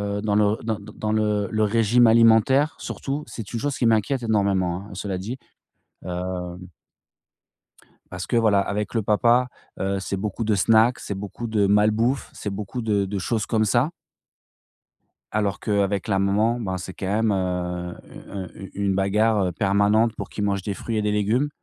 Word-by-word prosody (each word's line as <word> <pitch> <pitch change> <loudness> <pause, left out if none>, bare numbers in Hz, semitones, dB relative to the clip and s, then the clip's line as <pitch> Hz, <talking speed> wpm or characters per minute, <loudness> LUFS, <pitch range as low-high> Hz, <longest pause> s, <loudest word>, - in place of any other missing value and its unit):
heu, 100 - -2
dans 105 -1 0
le 105 0 +3
d 110 0 -1
d 100 - -11
dans 105 0 -2
le 105 -2 +1
le 110 0 +1
régime 115 +2 +4
alimentaire 115 +6 +5
surtout, 145 +2 -4
c'est 110 -4 -8
une 115 - -2
chose 145 +2 -2
qui 125 - 0
m'inquiète 115 +3 +2
énormément, 100 -4 0
hein, - - -13
cela 95 0 -4
dit, 110 +8 -5 0.7
heu 90 0 -4 1.5
parce 90 0 -6
que, 120 - +1
voilà, 110 -3 +4
avec 100 +2 -2
le 115 - +1
papa, 120 +4 +3 0.3
heu, 95 0 -1
c'est 95 0 -3
beaucoup 105 +3 -3
de 110 -1 +1
snacks, 110 +5 +4
c'est 100 - -5
beaucoup 105 +4 -6
de 110 -2 +2
mal 105 +2 +4
bouffe, 120 +5 0
c'est 105 - -5
beaucoup 105 +5 -5
de 105 -3 +1
de 100 +1 -3
choses 110 +2 -1
comme 110 -2 +2
ça. 120 +7 +2 1.4
Alors 105 -2 0
qu'avec 100 -1 0
la 100 -3 +1
maman, 105 +5 +2
ben, 95 -5 -3
c'est 90 +1 -7
quand 95 - -5 0.2
même, 110 - +2
heu, 90 -2 -2
u - - -12
heu, 95 -3 -6
u 95 - -9
une 100 -1 0
bagarre, 105 +1 +2
heu, - - -2
permanente 100 +4 +2
pour - - -6
qu'il 105 - -4
mange 100 -1 0
des 100 +1 -3
fruits 115 +3 -4
et - - +1
des 105 0 0
légumes, 110 +8 +1
105 Hz, 190 wpm, -23 LUFS, 100-115 Hz, 1.5 s, alimentaire